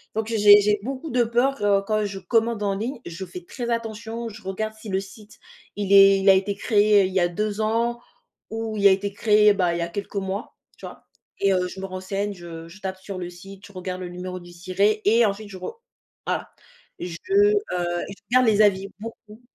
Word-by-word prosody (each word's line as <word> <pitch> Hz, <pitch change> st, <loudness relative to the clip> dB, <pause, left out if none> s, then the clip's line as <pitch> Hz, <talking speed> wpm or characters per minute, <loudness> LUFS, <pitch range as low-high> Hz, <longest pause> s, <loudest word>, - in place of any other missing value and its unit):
Donc 220 Hz, 0 st, -1 dB
j'ai 210 Hz, -2 st, +7 dB
j'ai 210 Hz, 0 st, +2 dB
beaucoup 270 Hz, +5 st, -5 dB
de 245 Hz, -2 st, +2 dB
peur 235 Hz, -4 st, +1 dB
quand 215 Hz, -1 st, +1 dB
je 195 Hz, -1 st, -5 dB
commande 225 Hz, 0 st, 0 dB
en 200 Hz, -1 st, 0 dB
ligne, 235 Hz, +6 st, -4 dB
je 175 Hz, +3 st, -6 dB
fais 180 Hz, 0 st, -9 dB
très 240 Hz, +4 st, -5 dB
attention, 230 Hz, 0 st, -4 dB
je 215 Hz, 0 st, -12 dB
regarde 215 Hz, +3 st, -3 dB
si 215 Hz, -, -9 dB
le 190 Hz, -, 0 dB
site 205 Hz, +2 st, -13 dB, 0.4 s
il 205 Hz, -1 st, -3 dB
est 195 Hz, 0 st, +8 dB
il 195 Hz, +1 st, +3 dB
a -, -, +9 dB
été 195 Hz, +1 st, 0 dB
créé 210 Hz, -3 st, +4 dB
il 185 Hz, -, -4 dB
y 190 Hz, -, +2 dB
a 175 Hz, -, +3 dB
2 210 Hz, +4 st, -3 dB
ans 230 Hz, +2 st, 0 dB, 0.5 s
ou 225 Hz, -1 st, -4 dB
il 200 Hz, -1 st, +6 dB
a -, -, +7 dB
été 200 Hz, +1 st, 0 dB
créé, 210 Hz, -1 st, +4 dB
bah, 180 Hz, -3 st, +1 dB
il -, -, -2 dB
y 170 Hz, -, -2 dB
a 170 Hz, -, -1 dB
quelques 200 Hz, +3 st, -7 dB
mois, 195 Hz, +2 st, -4 dB, 0.2 s
tu -, -, -10 dB
vois -, -, -13 dB, 0.4 s
et 195 Hz, -1 st, +3 dB
heu, 180 Hz, -1 st, +1 dB
je 190 Hz, -, -9 dB
me 195 Hz, -, -4 dB
renseigne, 195 Hz, +2 st, -4 dB
je 170 Hz, -3 st, -9 dB
je 195 Hz, +5 st, -15 dB
tape 190 Hz, -1 st, -4 dB
sur 190 Hz, 0 st, -8 dB
le 175 Hz, -1 st, -5 dB
site, 195 Hz, +3 st, -13 dB
je -, -, -16 dB
regarde 185 Hz, 0 st, -6 dB
le 180 Hz, -, -5 dB
numéro 180 Hz, +1 st, -6 dB
du 175 Hz, 0 st, -13 dB
SIRET 195 Hz, +5 st, 0 dB
et 230 Hz, +3 st, +5 dB
ensuite 205 Hz, +1 st, -2 dB
je 190 Hz, -, -9 dB
ro 320 Hz, -, -7 dB, 0.5 s
voilà. -, -, -2 dB, 0.5 s
Je, 175 Hz, -1 st, -5 dB
heu, 410 Hz, +1 st, +5 dB, 0.6 s
je 195 Hz, -, -8 dB, 0.2 s
regarde 255 Hz, 0 st, +5 dB
les 215 Hz, -1 st, +4 dB
avis 195 Hz, -2 st, +3 dB
beaucoup, 220 Hz, 0 st, -10 dB
205 Hz, 225 wpm, -24 LUFS, 190-220 Hz, 0.6 s, a